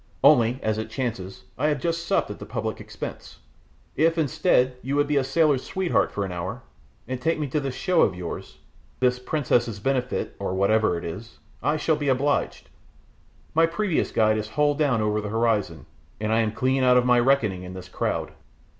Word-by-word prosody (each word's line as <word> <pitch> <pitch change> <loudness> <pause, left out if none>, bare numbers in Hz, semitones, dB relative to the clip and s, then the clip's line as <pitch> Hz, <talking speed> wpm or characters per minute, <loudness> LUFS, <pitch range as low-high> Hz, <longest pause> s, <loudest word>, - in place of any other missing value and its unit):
Only, 120 +2 +5
as 110 0 0
it 110 0 -4
chances, 110 -7 -4 0.2
I 150 - +2
have 150 -2 0
just 170 +2 -2
supped - - +1
at - - -8
the - - -7
public - - -4
expense. - - -8 0.6
If, 165 +2 +2
instead, 150 -4 +2
you 135 +3 -2
would 145 0 +3
be 145 0 -1
a 135 - +3
sailor's 140 0 +2
sweetheart 190 -2 0
for 100 - -2
an 95 - -6
hour, 85 -1 -5 0.4
and 130 0 -4
take 165 +3 +1
me 150 - -2
to 150 - 0
this 135 -3 -4
show 180 -3 +2
of - - +3
yours 90 -2 -7 0.4
your 125 -1 +4
princess's 120 -7 0
benefit, 130 +2 -1
or 95 - -2
whatever 100 -1 +2
it 85 - -7
is 100 +8 -7 0.2
I 150 +1 +1
shall 155 0 +1
be 145 -2 -1
obliged; 140 +2 0 0.9
my 165 +1 +4
previous 175 0 -1
guide 110 -1 +3
is 110 0 -5
hull 145 +4 +2
down 140 -7 +1
over 105 0 0
the 105 - -5
horizon, 105 -7 0 0.3
and 110 +1 -1
I 115 - +3
am 110 -2 +1
clean 130 +3 +1
out 125 -1 +5
of 125 - +3
my 125 -1 +5
reckoning 120 -8 +2
in 90 0 -8
this 95 - -8
crowd." - - -2
125 Hz, 200 wpm, -25 LUFS, 110-145 Hz, 0.9 s, Only